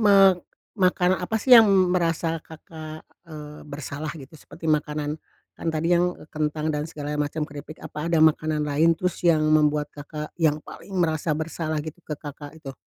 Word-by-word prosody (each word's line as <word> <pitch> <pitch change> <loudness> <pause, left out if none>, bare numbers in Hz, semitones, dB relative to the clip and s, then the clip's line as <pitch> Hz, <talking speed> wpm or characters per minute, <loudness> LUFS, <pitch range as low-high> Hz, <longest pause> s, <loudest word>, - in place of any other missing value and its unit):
me 200 - +7 0.7
makanan 185 0 +3
apa 220 +5 -1
sih 250 +4 +2
yang 225 -3 +10 0.2
merasa 165 -2 0
Kakak, 155 0 -10 0.2
eee, 150 -1 -9
bersalah 145 +1 -5
gitu 135 -1 -12
seperti 155 +1 -14
makanan 150 0 0 0.3
kan 165 - -5
tadi 165 +2 +1
yang 175 +1 +2
e - - -13
kentang 155 0 -1
dan 150 +1 -2
segalanya 150 -1 -4
macam 150 +1 -1
keripik, 150 +1 -9
apa 150 +2 -5
ada 170 - +2
makanan 155 -1 +2
lain 155 +3 +3
terus 180 +1 -2
yang 165 -3 +3
membuat 150 -1 +2
Kakak 150 +1 -7
yang 150 -2 +3
paling 195 -1 -9
merasa 160 -2 +1
bersalah 160 -1 -3
gitu 160 +2 -8
ke 150 -3 -6
Kakak 145 +1 -9
itu? 140 -4 -8
155 Hz, 175 wpm, -25 LUFS, 150-165 Hz, 0.7 s, yang